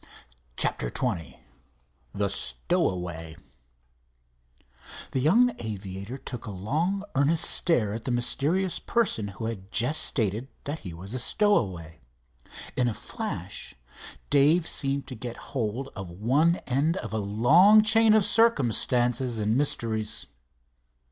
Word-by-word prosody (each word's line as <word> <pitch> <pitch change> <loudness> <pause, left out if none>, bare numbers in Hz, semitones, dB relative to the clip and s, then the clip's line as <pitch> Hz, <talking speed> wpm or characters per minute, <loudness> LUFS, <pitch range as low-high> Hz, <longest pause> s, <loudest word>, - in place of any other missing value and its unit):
CHAPTER - - +1
XX 85 - -2 0.8
THE 100 0 -1
STOWAWAY 80 +5 -1 1.8
The 130 - -1
young 230 - +3
aviator 100 +1 -6
took 125 -3 -8
a - - -4
long, 155 - -2
earnest 155 +5 +2
stare 115 - +1
at 115 +1 -6
the - - -2
mysterious 150 +9 0
person 205 - 0
who 100 +3 -7
had 100 -4 -6
just 125 +7 +1
stated 110 +1 0 0.2
that 145 +3 -4
he 90 - -8
was 95 +6 -8
a 130 - -2
stowaway. 95 - 0 0.8
In 125 -1 +1
a 115 - -2
flash - - -6 0.6
Dave 155 +5 +4
seemed 140 0 -1
to - - -8
get 120 0 -7 0.2
hold 125 +1 -2
of 95 -4 -7
one 130 - +2
end 145 +7 0
of - - -6
a - - 0
long 150 - +5
chain 220 0 +5
of 215 -3 +4
circumstances 125 - +2
and 110 +1 0
mysteries. 110 -6 -1
120 Hz, 125 wpm, -26 LUFS, 100-155 Hz, 1.8 s, long